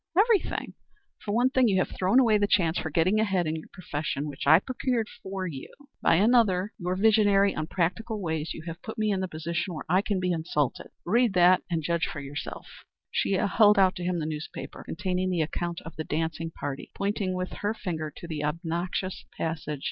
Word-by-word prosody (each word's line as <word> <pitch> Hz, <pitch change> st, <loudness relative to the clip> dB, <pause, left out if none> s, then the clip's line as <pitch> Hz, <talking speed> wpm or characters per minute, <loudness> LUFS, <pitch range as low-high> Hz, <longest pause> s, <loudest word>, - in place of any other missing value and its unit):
Everything. 430 Hz, 0 st, +2 dB, 0.5 s
For 205 Hz, -, -3 dB
one 245 Hz, +4 st, +3 dB
thing 260 Hz, -3 st, +4 dB
you 195 Hz, -3 st, +2 dB
have 185 Hz, -, +1 dB
thrown 190 Hz, +7 st, +4 dB
away 225 Hz, -5 st, +4 dB
the 205 Hz, -, +2 dB
chance 170 Hz, -5 st, +2 dB
for 160 Hz, -, -3 dB
getting 175 Hz, +7 st, +2 dB
ahead 195 Hz, -5 st, +1 dB
in 155 Hz, 0 st, -1 dB
your 160 Hz, -, -7 dB
profession 150 Hz, -4 st, -3 dB
which 140 Hz, -1 st, -6 dB
I 160 Hz, +2 st, +9 dB
procured 245 Hz, +2 st, -1 dB
for 190 Hz, -1 st, -4 dB
you. 145 Hz, -7 st, -7 dB, 0.3 s
For -, -, +2 dB
another, 205 Hz, 0 st, +3 dB
by 175 Hz, -, -5 dB
your 180 Hz, -, +1 dB
visionary, 205 Hz, -1 st, +4 dB
unpractical 185 Hz, +7 st, -2 dB
ways, 160 Hz, -4 st, -2 dB
you 160 Hz, -, -7 dB
have 165 Hz, -1 st, -7 dB
put 220 Hz, -, -7 dB
me 215 Hz, -1 st, +1 dB
in 195 Hz, -, 0 dB
the 190 Hz, -, -1 dB
position 170 Hz, +2 st, -3 dB
where 155 Hz, -, -6 dB
I 185 Hz, +4 st, +3 dB
can 200 Hz, -2 st, -1 dB
be 180 Hz, 0 st, 0 dB
insulted. 160 Hz, -5 st, -1 dB, 0.2 s
Read 230 Hz, +1 st, +2 dB
that, 180 Hz, +1 st, +6 dB
and 165 Hz, -3 st, -1 dB
judge 170 Hz, 0 st, 0 dB
for 150 Hz, -, -6 dB
yourself." 140 Hz, +1 st, -6 dB, 0.5 s
She -, -, 0 dB
held 205 Hz, +2 st, +4 dB
out 190 Hz, -1 st, +5 dB
to 180 Hz, -, -5 dB
him 180 Hz, 0 st, 0 dB
the 160 Hz, -, -2 dB
newspaper 155 Hz, 0 st, -6 dB
containing 185 Hz, +1 st, -2 dB
the 175 Hz, -3 st, +1 dB
account 170 Hz, +2 st, -4 dB
of 165 Hz, -2 st, -10 dB
the 160 Hz, -, -2 dB
dancing 160 Hz, +2 st, -2 dB
party, 145 Hz, -4 st, -6 dB
pointing 200 Hz, -2 st, -1 dB
with 185 Hz, 0 st, -3 dB
her 205 Hz, +2 st, 0 dB
finger 160 Hz, -7 st, -4 dB
to 170 Hz, -, -8 dB
the 155 Hz, -3 st, -4 dB
obnoxious 170 Hz, +4 st, -3 dB
passage. 155 Hz, -3 st, -3 dB
180 Hz, 205 wpm, -27 LUFS, 160-205 Hz, 0.5 s, I